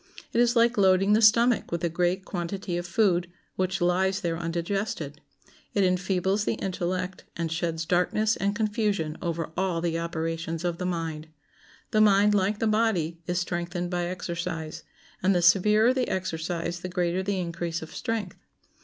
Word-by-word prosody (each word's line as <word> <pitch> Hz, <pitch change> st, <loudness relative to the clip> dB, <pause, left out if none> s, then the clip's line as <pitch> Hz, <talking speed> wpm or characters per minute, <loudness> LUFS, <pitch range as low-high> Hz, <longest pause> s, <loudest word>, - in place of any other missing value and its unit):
It 235 Hz, -, +4 dB
is 240 Hz, 0 st, +3 dB
like 235 Hz, -1 st, +3 dB
loading 195 Hz, +1 st, +4 dB
the 215 Hz, -, +4 dB
stomach 230 Hz, +2 st, +4 dB
with 170 Hz, 0 st, -2 dB
a -, -, +3 dB
great 180 Hz, +3 st, 0 dB
quantity 180 Hz, 0 st, -4 dB
of 175 Hz, 0 st, -3 dB
food, 175 Hz, -4 st, +2 dB, 0.2 s
which 185 Hz, 0 st, -1 dB
lies 190 Hz, +2 st, +2 dB
there 170 Hz, -3 st, -1 dB
undigested. 170 Hz, -2 st, -3 dB, 0.5 s
It 200 Hz, -, +3 dB
enfeebles 190 Hz, +2 st, +1 dB
the -, -, 0 dB
intellect, 185 Hz, 0 st, -3 dB
and 165 Hz, -1 st, -2 dB
sheds 165 Hz, -1 st, -2 dB
darkness 185 Hz, +6 st, +2 dB
and 200 Hz, +1 st, -1 dB
confusion 205 Hz, -7 st, 0 dB
over 165 Hz, -1 st, -3 dB
all 185 Hz, -3 st, 0 dB
the 165 Hz, -1 st, -1 dB
operations 165 Hz, 0 st, -3 dB
of 175 Hz, -1 st, -1 dB
the 180 Hz, -, -1 dB
mind. 165 Hz, -3 st, -3 dB, 0.6 s
The 215 Hz, -, +3 dB
mind, 205 Hz, 0 st, +5 dB
like 205 Hz, +1 st, +1 dB
the 225 Hz, -, -1 dB
body, 215 Hz, -7 st, +1 dB
is 175 Hz, 0 st, -1 dB
strengthened 175 Hz, 0 st, -2 dB
by 175 Hz, -1 st, -1 dB
exercise, 170 Hz, -3 st, -4 dB, 0.4 s
and 190 Hz, +1 st, +3 dB
the 175 Hz, -, +3 dB
severer 210 Hz, +6 st, +5 dB
the 260 Hz, -1 st, -1 dB
exercise 170 Hz, -1 st, -2 dB
the 185 Hz, -, -6 dB
greater 180 Hz, 0 st, 0 dB
the 195 Hz, 0 st, -1 dB
increase 170 Hz, -1 st, -3 dB
of 160 Hz, -, -10 dB
strength. 220 Hz, -6 st, -3 dB
180 Hz, 165 wpm, -27 LUFS, 170-200 Hz, 0.6 s, mind